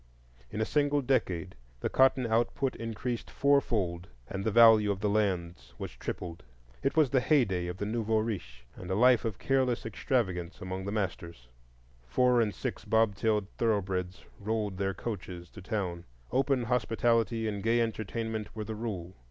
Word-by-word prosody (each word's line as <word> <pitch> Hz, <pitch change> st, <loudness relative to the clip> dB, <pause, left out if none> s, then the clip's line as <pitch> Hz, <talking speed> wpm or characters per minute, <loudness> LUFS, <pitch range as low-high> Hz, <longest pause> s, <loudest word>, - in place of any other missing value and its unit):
In 105 Hz, -, -5 dB
a 110 Hz, -, +2 dB
single 145 Hz, +1 st, +1 dB
decade 95 Hz, -9 st, 0 dB, 0.3 s
the -, -, 0 dB
cotton 130 Hz, -1 st, +4 dB
output 120 Hz, +4 st, 0 dB
increased 115 Hz, +1 st, -4 dB
four 140 Hz, 0 st, +3 dB
fold 90 Hz, -8 st, -2 dB, 0.2 s
and 95 Hz, +6 st, -4 dB
the 110 Hz, -, +1 dB
value 110 Hz, -1 st, +7 dB
of 100 Hz, +1 st, -4 dB
lands 90 Hz, -, -1 dB
was -, -, -5 dB
tripled. 85 Hz, -2 st, -6 dB, 0.4 s
It 135 Hz, -, -1 dB
was 150 Hz, -5 st, +4 dB
the 135 Hz, -, +4 dB
heyday 100 Hz, -, +2 dB
of 90 Hz, +1 st, -5 dB
the 100 Hz, -, -3 dB
nouveau 110 Hz, 0 st, 0 dB
riche, 85 Hz, -, -4 dB
and 90 Hz, -, -9 dB
a 95 Hz, -, 0 dB
life 125 Hz, +2 st, +5 dB
of 110 Hz, -4 st, -2 dB
careless 130 Hz, -4 st, +1 dB
extravagance 95 Hz, -6 st, -1 dB
among 95 Hz, -1 st, -5 dB
the 100 Hz, -, -3 dB
masters. 85 Hz, -, -4 dB, 0.6 s
Four 125 Hz, -, +3 dB
and 110 Hz, -2 st, +1 dB
six -, -, -5 dB
bobtailed 110 Hz, -1 st, +2 dB
thoroughbreds 95 Hz, -5 st, -1 dB
rolled 105 Hz, -2 st, -2 dB
their 95 Hz, -1 st, 0 dB
coaches 90 Hz, -5 st, -6 dB
to 105 Hz, -, -11 dB
town; 90 Hz, -4 st, -3 dB, 0.3 s
open 135 Hz, 0 st, +2 dB
hospitality 115 Hz, -1 st, +1 dB
and 105 Hz, -2 st, -3 dB
gay 115 Hz, +3 st, +2 dB
entertainment 110 Hz, -1 st, -3 dB
were 110 Hz, -, -3 dB
the 110 Hz, -, -4 dB
rule. 100 Hz, -6 st, -5 dB
110 Hz, 160 wpm, -30 LUFS, 95-120 Hz, 0.6 s, value